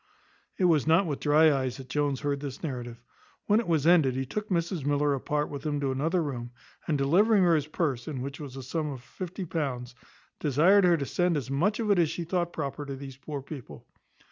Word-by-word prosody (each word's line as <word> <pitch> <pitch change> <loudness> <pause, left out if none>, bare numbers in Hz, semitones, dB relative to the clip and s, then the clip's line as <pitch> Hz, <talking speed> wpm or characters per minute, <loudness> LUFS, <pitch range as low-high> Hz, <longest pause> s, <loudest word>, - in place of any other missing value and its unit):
It - - -1
was 155 -5 +3
not 165 +5 +5
with 145 -4 -3
dry 155 +1 +5
eyes 130 -2 -2
that 135 -1 -10
Jones 140 0 -1
heard 140 -1 -1
this 140 0 -7
narrative; 120 -5 -5 0.4
when 210 +1 +4
it 235 - -3
was 160 -4 +1
ended 160 -7 +5
he 135 0 -1
took 210 +10 -4
Mrs 170 -3 -1
Miller 145 0 +2
apart 150 +2 -1
with 140 -2 -7
him 150 -1 -1
into 140 -2 -1
another 160 +6 0
room, 120 -5 -4 0.4
and, 150 - +1
delivering 190 +9 +4
her 175 -2 +4
his 150 -2 +1
purse, 145 -6 -2
in 145 -5 -4
which 140 +2 -6
was 140 -4 -8
the 135 - -7
sum 155 +4 -2
of 135 -4 -6
£50, 150 -4 -4 0.5
desired 170 +8 +4
her 175 -1 +5
to 140 - -3
send 175 +2 +1
as 135 -2 -4
much 185 +11 +1
of 215 -2 +1
it 195 - +4
as 165 -3 +3
she 170 - -4
thought 175 0 -1
proper 145 -2 -4
to 140 -1 -5
these 135 -1 -9
poor 140 0 -6
people. 125 - -10
150 Hz, 220 wpm, -28 LUFS, 135-170 Hz, 0.5 s, not